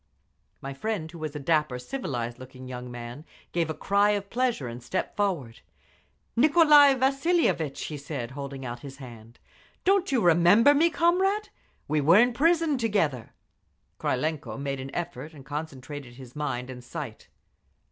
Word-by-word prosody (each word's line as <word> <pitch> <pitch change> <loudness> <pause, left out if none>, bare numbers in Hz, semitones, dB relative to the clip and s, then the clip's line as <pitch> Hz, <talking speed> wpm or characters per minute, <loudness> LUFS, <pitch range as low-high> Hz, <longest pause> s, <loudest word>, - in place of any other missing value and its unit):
My 135 0 -5
friend, 165 +1 -3
who 170 - -10
was 155 -1 -5
a - - -3
dapper, 150 -3 +1
civilized 125 - -4
looking 130 0 -11
young 125 -1 -7
man, 120 +4 -8 0.3
gave 170 -2 0
a 155 - -3
cry 200 +1 +2
of 200 0 -8
pleasure 240 - 0
and 120 +1 -7
stepped 155 +10 -3
forward. 170 - -2 0.8
"Nicolai 295 0 +7
Vasilievitch!" 270 - +1
he 150 - -5
said, 140 -4 -5
holding 140 -1 -7
out 120 0 -5
his 135 +1 -10
hand. 120 -3 -12 0.5
"Don't 390 -3 +3
you 260 - +3
remember 175 - +6
me, 320 +4 +4
comrade? 375 +6 +1 0.4
We 155 -1 +1
were 165 +6 +6
in 245 +2 +5
prison 320 +1 +2
together." 165 - -1 0.6
Krylenko 150 +2 -2
made 140 -1 -3
an 130 +1 -6
effort 160 -3 -5
and 135 -2 -13
concentrated 145 -3 -7
his 125 -2 -12
mind 130 -4 -3
and 125 -1 -10
sight. 130 -4 -7
150 Hz, 155 wpm, -27 LUFS, -, 0.8 s, Nicolai